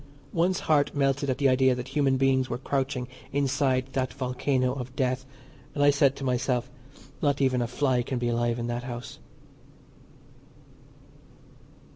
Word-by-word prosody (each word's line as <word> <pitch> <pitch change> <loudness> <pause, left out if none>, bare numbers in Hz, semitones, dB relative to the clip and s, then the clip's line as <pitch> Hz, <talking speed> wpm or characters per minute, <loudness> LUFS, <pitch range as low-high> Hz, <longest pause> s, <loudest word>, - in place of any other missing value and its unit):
One's 175 +2 +1
heart 150 -2 +2
melted 140 0 +1
at 130 - 0
the 140 - +3
idea 130 0 +4
that 125 +1 -6
human 135 -1 +2
beings 130 -1 +2
were 120 - -2
crouching 135 -1 -2 0.2
inside 135 -1 0
that 130 -1 -1
volcano 130 0 0
of 130 -1 -7
death, 130 0 -1 0.5
and 145 - +2
I 145 - +7
said 140 -1 +3
to - - -8
myself, 125 -1 0 0.5
"Not 145 -1 +1
even 130 -2 +2
a 120 - 0
fly 130 0 +1
can 125 +1 -3
be 120 0 -1
alive 120 0 0
in 120 - -3
that 120 +1 -3
house." 120 -1 -7
130 Hz, 155 wpm, -27 LUFS, 125-140 Hz, 0.5 s, I